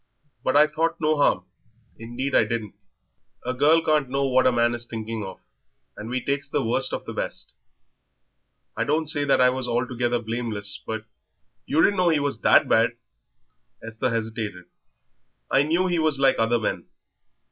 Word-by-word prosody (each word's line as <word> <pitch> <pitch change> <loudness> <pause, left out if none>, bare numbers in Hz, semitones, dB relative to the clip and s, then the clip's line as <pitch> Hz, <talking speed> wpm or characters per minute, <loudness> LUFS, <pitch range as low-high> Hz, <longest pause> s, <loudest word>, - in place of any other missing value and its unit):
But 130 - 0
I 150 - +7
thought 160 +2 -1
no 155 0 +1
harm, 95 -10 +2 0.5
indeed 120 +4 -5
I - - +5
didn't." 110 -2 -4 0.7
"A 125 - -1
girl 155 +5 +4
can't 150 -4 +1
know 140 +1 0
what 130 -1 +3
a - - +4
man 120 0 +2
is 120 0 -3
thinking 110 -1 -5
of, 95 -1 -8 0.6
and 110 - -8
we 125 0 -3
takes 140 0 -2
the - - 0
worst 115 - +1
for - - -3
the - - -6
best." - - -4 1.2
"I - - 0
don't 155 +2 0
say 145 -1 0
that 140 - +3
I 125 0 +5
was 130 -1 -3
altogether 120 0 0
blameless 110 -3 -4
but 110 -1 -4 0.3
" - - -50
"You 160 - +3
didn't 200 - +3
know 180 -1 +3
he 160 -3 +2
was 140 -5 -3
that - - +5
bad." 115 +1 +2 0.9
Esther 115 +3 -2
hesitated. 110 -5 -4 0.9
"I 135 - +4
knew 165 +5 +1
he 175 -2 0
was 155 -3 +1
like 135 -1 +3
other 115 +1 +2
men. 110 - -3
125 Hz, 180 wpm, -24 LUFS, 115-145 Hz, 1.2 s, I